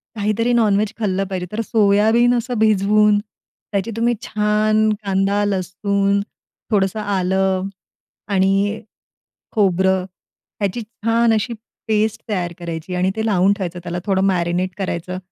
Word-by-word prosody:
काहीतरी 215 +3 0
नॉन-व्हेज 215 -2 +2
खाल्लं 195 -3 0
पाहिजे, 185 -2 -4
तर 215 +2 -2
सोयाबीन 220 +3 +3
असं 240 +1 -3
भिजवून 210 0 +4
त्याची 205 0 -7
तुम्ही 235 +1 +2
छान 215 +1 +2
कांदा, 195 +1 +1
लसूण, 200 +1 0 0.5
थोडंसं 195 0 +1
आलं 190 -1 0 0.7
आणि 195 +2 +2 0.7
खोबरं 190 -3 +2 0.6
यांची 200 +4 -1
छान 230 +1 +1
अशी 220 +3 -1 0.4
पेस्ट 220 0 +1
तयार 180 -5 -2
करायची 170 0 -5
आणि 180 +1 +1
ती 220 0 -1
लावून 195 -2 +3
ठेवायची, 185 -3 -4
त्याला 175 0 -4
थोडं 190 -1 +1
मॅरिनेट 180 0 0
करायचं 185 -1 -3
200 Hz, 120 wpm, -20 LUFS, 190-215 Hz, 0.7 s, भिजवून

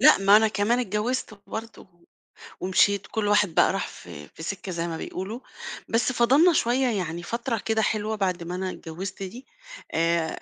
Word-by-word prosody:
لأ - - +8
ما 195 +1 +6
أنا 220 0 +5
كمان 215 +4 +1
اتجوزت 215 0 -2
برضه. 225 0 -7
و 175 -2 -24 0.6
ومشيت 195 +2 +2
كل 215 -2 -1
واحد 205 -5 +3
بقى - - +5
راح - - -2
في 75 0 -11
في 160 - -12
سكة 190 +1 -4
زي 170 0 -2
ما 165 -1 -4
بيقولوا، 200 +9 -5 0.5
بس 235 +3 +2
فضّلنا 275 +9 +5
شوية 255 0 +2
يعني 175 -6 -2
فترة 235 +2 -2
كده 220 0 +1
حلوة 215 0 0
بعد 185 -4 -1
ما 175 +2 -5
أنا 185 0 -2
اتجوزت 185 +3 -6
دي، 235 +8 -8 0.5
آآ، 165 0 +2
205 Hz, 180 wpm, -25 LUFS, 180-230 Hz, 0.6 s, لأ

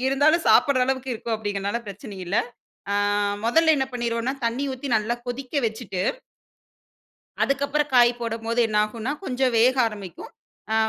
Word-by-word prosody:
இருந்தாலும் 300 +5 +3
சாப்பிடுற 280 -4 +5
அளவுக்கு 265 0 -2
இருக்கும் 230 0 -3
அப்டின்கிறதுனால 205 0 -2
பிரச்சனை 205 +2 -8
இல்ல. 175 +4 -4 0.6
ஆ - - +1 0.5
மொதல்ல 320 +7 +4
என்ன 265 - +1
பண்ணிருவோம்ன்னா 235 +1 -1
தண்ணீ 235 +4 0
ஊத்தி 260 +2 -6
நல்லா 220 +2 +1
கொதிக்க 250 +1 -6
வச்சிட்டு, 220 -4 -4 1.4
அதுக்கப்புறம் 285 +1 0
காய் 240 -1 +6
போடம்போது 230 0 -2
என்ன 210 - -1
ஆகும்ன்னா 230 +5 -4
கொஞ்சம் 255 -2 0
வேக 250 +3 +5
ஆரம்பிக்கும். 205 -6 -7 0.4
ஆ - - +2
240 Hz, 140 wpm, -24 LUFS, 220-270 Hz, 1.4 s, காய்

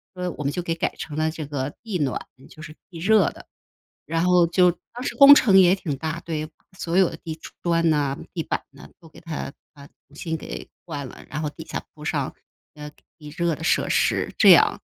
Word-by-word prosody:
所 180 - -6
以 - - -1
我 150 - -4
们 140 - 0
就 180 - -2
给 165 -1 -2
改 - - -2
成 150 -1 -7
了 155 0 +1
这 155 -2 -6
个 145 -1 -4
地 210 -5 -3
暖， 135 -3 -1 0.3
就 155 - -14
是 155 -1 -10
地 170 -3 -10
热 205 +1 +4
的。 - - -14 0.6
然 165 +3 0
后 180 -1 +4
就 180 +1 +4 0.2
当 245 +1 -7
时 - - -3
工 280 0 +10
程 200 -9 +5
也 185 0 +6
挺 150 -7 -4
大， 160 +3 -4
对， 155 -2 -4 0.3
所 170 +1 -2
有 190 -2 +4
的 - - -8
地 160 -1 -7 0.2
砖 170 -1 +2
呐、 145 -3 0 0.2
地 165 - -2
板 - - -2
呐 140 +1 -14
都 165 - -16
给 - - -16
它 160 -4 -6 0.2
把 140 -2 -14
重 145 - -26
新 160 -2 -3
给 - - -8 0.2
换 145 -4 -5
了， - - -12
然 150 - -4
后 150 - -1
底 160 - -11
下 - - -5
铺 150 -1 -12
上， 140 -3 -2 0.4
呃， 150 0 -9 0.3
地 150 -1 -11
热 170 -2 +1
的 - - -11
设 - - +2
施， - - +1
这 - - +7
样。 - - +6
160 Hz, 245 characters per minute, -23 LUFS, 150-175 Hz, 0.6 s, 工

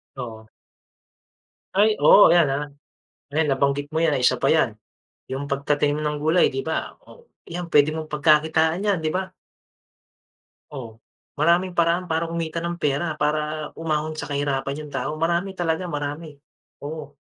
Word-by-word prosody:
Oo. 110 -4 -8 1.3
Ay 210 +2 +6
oh 205 - +8
yan, 170 -4 +5
ah, 145 +2 -1 0.7
ayan 155 +1 +1
nabanggit 140 +1 0
mo 160 - +1
yan, 155 -4 +2
ah, - - -2
isa - - +2
pa - - +2
yan, - - +3 0.5
yung 140 +2 -5
pagtatanim 145 +1 0
ng 150 0 -1
gulay 160 +4 +4
di 405 - -2
ba - - -3
o 485 -1 -18 0.2
yan 175 +1 -4
puwede 150 -2 +4
mong 155 -1 -6
pagkakitaan 160 +4 +2
yan 200 -3 +2
di - - +2
ba? 190 0 -3 1.4
Oh 115 -4 -9 0.4
maraming 175 +4 +3
paraan 170 +1 +1
para 165 +1 0
kumita 165 0 -3
ng 170 0 -3
pera 150 +2 0
para 150 0 -1
umahon 155 -1 -1
sa 155 - -6
kahirapan 140 0 -2
yung 145 - -12
tao, 135 +2 -2
marami 170 +4 -1
talaga 175 +1 -1
marami 145 +1 -5 0.5
oo. 145 -1 -7
155 Hz, 155 wpm, -23 LUFS, 145-170 Hz, 1.4 s, oh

